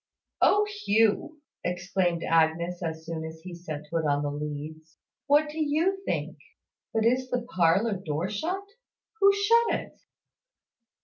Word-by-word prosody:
"O 415 +1 +5 0.2
Hugh!" 225 - +2 0.2
exclaimed 180 -1 -1
Agnes, 165 +2 +1
as 160 -1 -4
soon 165 -1 -4
as 160 0 -8
he 180 +1 -8
set 155 -4 -7
foot 165 -1 0
on 145 -1 +1
the 145 - -1
leads. 150 +2 -6 0.3
"What 295 +2 +4
do 305 +2 -6
you 325 +7 +1
think? - - -3 0.5
But 225 0 +1
is 255 +2 +2
the 250 -1 -1
parlour 195 0 +2
door 155 +2 -2
shut? 330 - -3 0.6
Who 395 0 +7
shut 455 +4 +3
it?" - - -13
180 Hz, 140 wpm, -27 LUFS, -, 0.6 s, Who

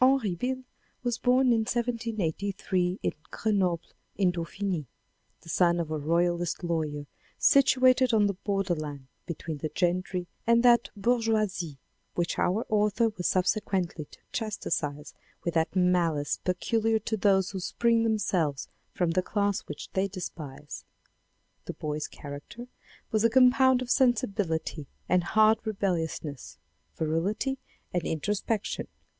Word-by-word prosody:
Henri 255 -7 +4
Beyle 255 +8 -3 0.4
was 240 -1 -1
born 250 0 +4
in 230 - +3
1783 205 -5 -1
in - - +1 0.2
Grenoble 185 -6 0 0.3
in 190 -3 +3
Dauphiny, 175 -2 -3 0.5
the 165 - -14
son 175 +1 +3
of 160 -2 -3
a 155 - 0
royalist 175 +3 0
lawyer, 155 -4 -2 0.3
situated 255 -2 +5
on 215 -2 +4
the 200 - +1
borderland 175 -8 -2 0.2
between 160 -2 -5
the 155 - -3
gentry 180 +1 -1 0.2
and 235 0 +5
that 240 -1 +5
bourgeoisie 215 - 0 0.4
which 170 -1 -1
our 205 +6 +1
author 210 +2 +2
was 195 -5 -3
subsequently 185 -4 0
to - - -17
chastise 155 -9 -3 0.3
with 170 - -1
that 160 +2 0
malice 175 -5 +2
peculiar 220 +5 +1
to 220 0 -2
those 195 -2 +2
who 195 - -4
spring 230 +5 +2
themselves 185 -10 0 0.3
from 175 -2 +1
the 185 +2 +2
class 200 +1 0
which 150 - -7
they 190 +1 +1
despise. 155 -7 -7 0.8
The - - -5
boy's 150 0 -3
character 145 +12 -9 0.5
was 215 0 +2
a 230 - +5
compound 255 +1 +5
of 250 - -4
sensibility 195 - +1 0.2
and 180 -1 +3
hard 215 +3 +4
rebelliousness, 170 - -3 0.4
virility 195 +12 -1 0.3
and 175 - +1
introspection. 205 +7 -2
190 Hz, 125 wpm, -28 LUFS, 170-225 Hz, 0.8 s, situated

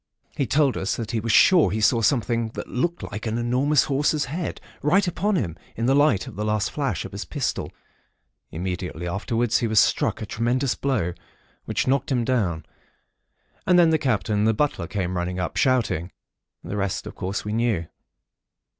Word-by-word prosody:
He 135 - -1
told 140 +2 +2
us 95 - -1
that 115 -1 -5
he 115 - 0
was 115 +1 -1
sure 170 - +6
he 105 +5 -2
saw 115 +2 +3
something 115 -2 +1
that - - -5
looked 170 +8 -2
like 105 +3 -5
an 110 +1 -1
enormous 130 +5 +2
horse's 145 +2 +1
head, 160 +5 -4 0.2
right 185 +7 +3
upon 200 +4 0
him, 90 - -1 0.2
in 115 - -2
the 130 - +3
light 140 -9 +3
of - - -10
the 105 - -3
last 105 -1 0
flash 135 - -2
of - - -8
his - - -5
pistol. - - -3 0.8
Immediately 90 0 -4
afterwards, 115 +5 0
he 120 - 0
was 110 -1 +4
struck - - +2
a - - -4
tremendous 120 +5 0
blow, 115 -11 -1 0.5
which - - -1
knocked 135 +1 0
him 120 -3 +1
down; 90 -11 0 1.0
and 180 0 +5
then 170 -2 +6
the 160 - +3
Captain 105 -6 0
and 105 - +3
the 110 - +2
butler 135 - -1
came 95 -2 -2
running 90 +1 -2
up, 90 - -3
shouting. 115 - +1 0.5
The 105 - -5
rest, 100 -2 -2
of - - -7
course, 95 +3 -4
we 105 - -3
knew. 115 -7 0
115 Hz, 190 wpm, -24 LUFS, 100-135 Hz, 1.0 s, sure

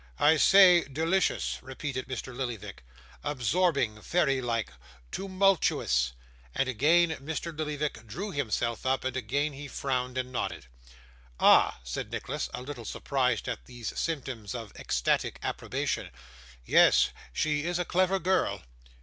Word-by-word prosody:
'I 155 +2 +5
say, 180 0 +7
delicious,' 165 +7 0
repeated 130 0 -5
Mr. 130 -1 -5
Lillyvick. 115 - -5 0.4
'Absorbing, 140 -4 +1
fairy 135 -5 +1
like, 115 - -2 0.4
toomultuous,' 185 - +1 0.4
and 135 - +1
again 155 +8 +4
Mr. 160 +3 -5
Lillyvick 150 -6 -3
drew 195 - -5
himself 120 - -1
up, 130 +1 0
and 130 -1 -2
again 140 +5 -1
he 145 +1 -8
frowned 130 -2 -2
and 130 0 -2
nodded. 120 - -3 0.7
'Ah!' - - +5
said - - -4
Nicholas, - - -3
a 125 - -6
little 135 -3 -7
surprised 125 0 -1
at - - -4
these 120 -3 -6
symptoms 130 -9 -3
of 115 -4 -7
ecstatic - - 0
approbation. - - -2 0.6
'Yes - - +5 0.2
she 150 - 0
is 175 0 0
a 180 - -1
clever 185 +2 +2
girl. 190 +1 0
135 Hz, 130 wpm, -29 LUFS, 120-165 Hz, 0.7 s, say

